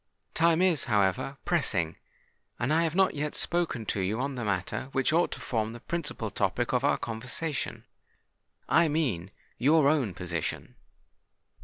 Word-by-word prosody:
Time 165 +1 +3
is, 175 -7 +3
however, 105 +5 +1
pressing; 95 - +1 0.6
and 120 +6 0
I 165 - +4
have 160 0 -2
not 190 0 +4
yet 150 0 -3
spoken 170 -10 0
to 100 - -1
you 100 +5 -1
on 135 +2 -1
the 125 -2 -4
matter 100 +5 -2
which 135 +3 +2
ought 170 +2 +3
to - - -8
form 110 -2 -2
the 120 - -9
principal 145 -7 -4
topic 105 +6 0
of 125 +1 +2
our 145 - +3
conversation;—I 125 +6 -3
mean 130 - -1 0.3
your 150 +2 +5
own 140 - +2
position. 85 -3 -4
130 Hz, 150 wpm, -28 LUFS, 105-155 Hz, 0.6 s, your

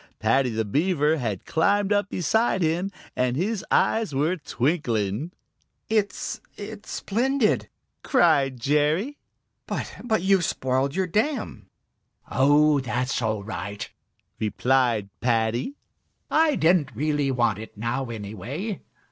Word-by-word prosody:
Paddy 125 +4 +2
the 110 -1 -1
Beaver 155 - +2
had 110 -8 -3
climbed 200 +5 +2
up 205 -1 +1
beside 190 +2 +1
him, 170 +4 0 0.3
and 125 0 +1
his 200 +4 -1
eyes 220 -10 +2
were 155 +6 +2
twinkling. 125 - -1 0.6
"It 215 -2 -1 0.2
it's 210 +1 -8
splendid!" 245 +2 +1 0.3
cried 145 - +3
Jerry. 150 - +1 0.5
"But - - -4
but 220 -7 0
you've 190 -2 +4
spoiled 130 -1 0
your 190 0 +1
dam!" 220 - -2 0.6
"Oh, 145 +3 +4
that's 125 +1 -1
all 110 -3 -1
right," 100 0 -5 0.5
replied 115 -1 +1
Paddy. 120 - 0 0.6
"I 315 -2 +4
didn't 160 -7 +2
really 145 +1 0
want 120 -5 +1
it 110 -1 -10
now, 115 +4 -2
anyway. 115 - -5
145 Hz, 115 wpm, -25 LUFS, 120-195 Hz, 0.6 s, you've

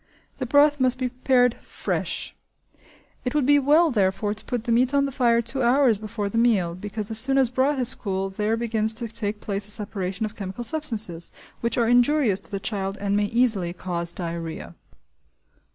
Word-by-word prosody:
The 260 - -3
broth 290 +2 +4
must 255 -1 +2
be 255 -1 -1
prepared 250 -1 +2
fresh; - - -4 0.9
it 250 +3 -3
would 295 -3 +2
be 290 +1 +5
well 305 +4 +4
therefore, 205 -1 0
to 215 - -11
put 245 -3 -3
the 235 - -2
meat 250 +4 +2
on 280 0 +3
the 275 - -3
fire 235 -3 +2
two 265 +4 -3
hours 245 -3 +3
before 215 -1 -4
the 230 +3 -1
meal, 205 -8 +2
because 210 +4 -4
as 220 - +3
soon 270 +3 +3
as 260 -3 +3
broth 265 +3 +1
is 250 -1 +4
cool 195 -2 -3
there 210 +3 -1
begins 220 -1 0
to 230 +1 -4
take 215 -2 -5
place 200 -1 -3
a - - -13
separation 205 -1 -2
of 215 +1 -7
chemical 195 +3 -6
substances, 220 - -1 0.3
which 235 - -1
are 235 -2 +2
injurious 245 -3 +3
to - - -4
the 200 -2 -4
child 195 -1 -3
and 200 0 -1
may 205 0 +2
easily 210 -6 +1
cause 175 -2 -3
diarrhea. 165 - -6
225 Hz, 195 wpm, -24 LUFS, 200-255 Hz, 0.9 s, be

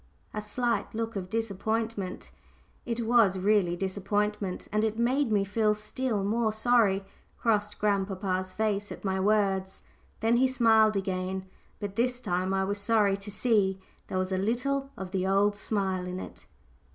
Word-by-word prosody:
A 210 - -3
slight 225 0 -1
look 225 0 -3
of 185 -2 -4
disappointment 220 -2 -2 0.6
it 235 -1 -2
was 225 -5 +4
really 190 -2 +2
disappointment, 200 +1 -2
and 215 +1 +1
it 220 0 0
made 250 +2 +1
me 205 -2 +3
feel 210 +1 +1
still 215 0 -2
more 220 +2 +1
sorry 215 -3 +3 0.3
crossed 210 -2 0
grandpapa's 190 -2 0
face 205 0 -1
at - - -8
my 190 0 0
words. 195 -2 +1 0.4
Then 225 +2 +3
he 260 +2 +4
smiled 220 -4 +4
again, 190 0 -2 0.3
but 200 -1 -5
this 245 +1 +1
time 185 -4 -1
I 195 0 +1
was 200 +1 -2
sorry 205 -1 +3
to 200 +1 -9
see 205 -3 +1 0.3
there 185 - -3
was 185 0 -1
a 185 - 0
little 270 +7 0
of 190 -1 -6
the 190 -1 0
old 200 +2 +3
smile 190 -3 -1
in 180 0 -4
it. - - -10
205 Hz, 160 wpm, -28 LUFS, 190-225 Hz, 0.6 s, was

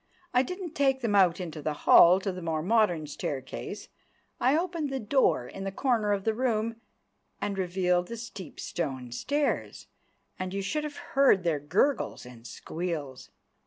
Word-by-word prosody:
I 250 - +5
didn't 360 +4 -5
take 270 -2 +2
them 230 -4 0
out 185 -3 +4
into 165 -4 -6
the 150 +1 -1
hall 180 +2 +8
to 195 - -2
the 180 0 -7
more 160 -2 -2
modern 190 -6 +2
staircase, 145 +7 -5 0.5
I 260 +5 +3
opened 335 -4 -2
the 270 0 -2
door 220 - +2
in 195 - -8
the 195 - -3
corner 225 -2 +1
of 200 -1 0
the 220 - +1
room, 230 -1 -1 0.6
and 205 -1 -2
revealed 180 -1 +1
the 235 - -6
steep 210 -8 -9
stone 130 -7 -4
stairs; 285 - -1 0.5
and 185 +1 -4
you 200 - -2
should 300 +9 -2
have 295 -1 -6 0.2
heard 270 -9 +5
their 165 -4 +1
gurgles 180 - 0
and 120 -1 -12
squeals. 155 -6 -5
195 Hz, 165 wpm, -28 LUFS, 170-255 Hz, 0.6 s, hall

